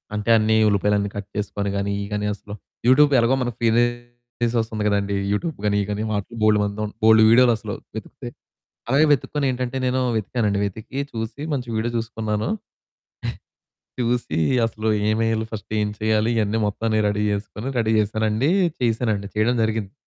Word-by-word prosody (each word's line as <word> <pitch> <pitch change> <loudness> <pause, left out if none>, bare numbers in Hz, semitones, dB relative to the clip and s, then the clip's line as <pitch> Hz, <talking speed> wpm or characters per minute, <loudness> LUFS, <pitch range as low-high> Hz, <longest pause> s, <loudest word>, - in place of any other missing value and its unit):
అంటే 105 +2 -3
అన్ని 110 0 +2
ఉల్లిపాయలన్ని 100 0 +1
కట్ 100 -1 -5
చేసుకొని 100 -1 -2
గాని 100 0 -1
ఇయి 100 - -3
గాని 105 0 -1
అసలు 105 0 -10 0.3
యూట్యూబ్ 145 +3 +6
ఎలాగో 120 +3 +3
మన 120 - -1
ఫీ 115 - +3 0.9
సోర్స్ 115 -1 0
ఉంది 105 - -2
గదండీ 100 -1 0 0.2
యూట్యూబ్ 150 +9 -2
గాని 100 0 +2
ఇయి 100 - -1
గాని 105 +1 -2
వాటి 100 +2 -3
బోలెడుమందుం 105 0 +1
బోలెడు 110 0 +7
వీడియోలసలు. 120 -2 +3 0.2
వెతికితే - - -7 0.6
అలాగే 145 +4 +4
వెతుక్కొని 145 +1 -1
ఏంటంటే 125 +1 -3
నేను 130 +1 +1 0.2
వెతికానుండి 105 -1 -1
వెతికి 110 +7 -6
చూసి 115 +5 -5
మంచి 125 -3 -3
వీడియో 115 +2 -1
చూసుకున్నాను. 110 -2 -2 1.5
చూసి 120 -9 -1 0.3
అసలు 110 -1 -2 0.2
ఏమెయ్యాలి 110 0 +1
ఫస్టు 110 0 -7
ఏం 105 - 0
చేయాలి 110 +1 +1
ఇయన్నీ 110 +1 +1
మొత్తం 110 +2 -3
నేను 105 -1 +2
రెడీ 105 +1 -1
జేసుకొని 105 +5 -4
రెడీ 110 0 +1
చేసానండి, 110 - +1 0.3
చేశానండి 110 -4 0
చేయడం 120 +3 +2
జరిగింది. 110 -3 -2
110 Hz, 155 wpm, -22 LUFS, 105-115 Hz, 1.5 s, బోలెడు